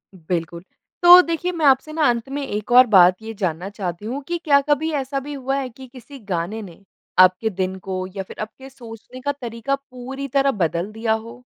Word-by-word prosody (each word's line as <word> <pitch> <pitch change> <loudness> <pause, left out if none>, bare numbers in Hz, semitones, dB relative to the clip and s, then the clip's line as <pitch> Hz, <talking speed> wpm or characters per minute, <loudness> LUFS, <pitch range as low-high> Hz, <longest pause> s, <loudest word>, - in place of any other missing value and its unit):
बिल्कुल, 170 -1 -4 0.4
तो 355 +1 +10
देखिए 335 +1 -2
मैं 330 -4 -2
आपसे 275 +3 +3
ना 315 0 0
अंत 235 +2 -2
में 280 +1 -4
एक 210 -2 -5
और 250 +1 +8
बात 185 -3 +6
ये 225 0 -7
जानना 180 -1 -2
चाहती 195 -2 -6
हूँ, 255 +6 -4
कि 345 0 -1
क्या 285 -3 +5
कभी 305 +2 +1
ऐसा 270 +1 -3
भी 290 +2 -8
हुआ 270 -1 -2
है 265 -2 -3
कि 260 +2 -13
किसी 265 +2 -13
गाने 200 +1 -4
ने 190 -1 -12 0.4
आपके 185 +4 +5
दिन 190 -1 -3
को 185 0 -4
या 195 - -3
फिर - - -13
आपके 245 +5 -8
सोचने 240 0 -12
का 285 - -1
तरीका 235 +3 -2
पूरी 270 0 -8
तरह 275 +1 +2
बदल 175 -2 -2
दिया 220 +1 -1
हो? 230 +3 -7
235 Hz, 210 wpm, -21 LUFS, 195-275 Hz, 0.4 s, तो